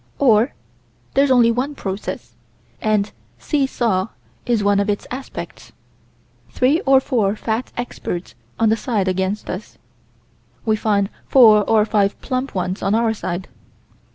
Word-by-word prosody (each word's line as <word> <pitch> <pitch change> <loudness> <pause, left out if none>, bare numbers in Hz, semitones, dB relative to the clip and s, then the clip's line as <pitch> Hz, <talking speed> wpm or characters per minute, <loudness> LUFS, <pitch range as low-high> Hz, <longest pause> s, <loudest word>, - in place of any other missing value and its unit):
Or 235 -2 +3 0.6
there's 275 +1 +3
only 240 -3 +5
one 260 +5 -2
process, 195 -4 -5 0.5
and 215 -1 +1 0.3
"see 285 -3 0
saw" 220 -7 0 0.4
is 235 -4 +1
one 200 0 +3
of 200 +1 0
its 205 - -1
aspects. 260 +2 -8 0.8
Three 275 +6 +2
or 270 0 +7
four 220 -7 0
fat 225 +2 -3
experts 185 -7 -5 0.3
on 225 -1 +4
the 220 - +2
side 215 -4 -1
against 190 +3 -1
us. 185 +4 -7 0.9
We 220 -1 +3
find 205 -2 0 0.2
four 220 -5 +7
or 215 -2 +4
five 205 -2 +1
plump 255 -1 -3
ones 185 0 -2
on 195 +2 +1
our 225 -1 +2
side. 185 -3 -4
220 Hz, 140 wpm, -20 LUFS, 200-250 Hz, 0.9 s, or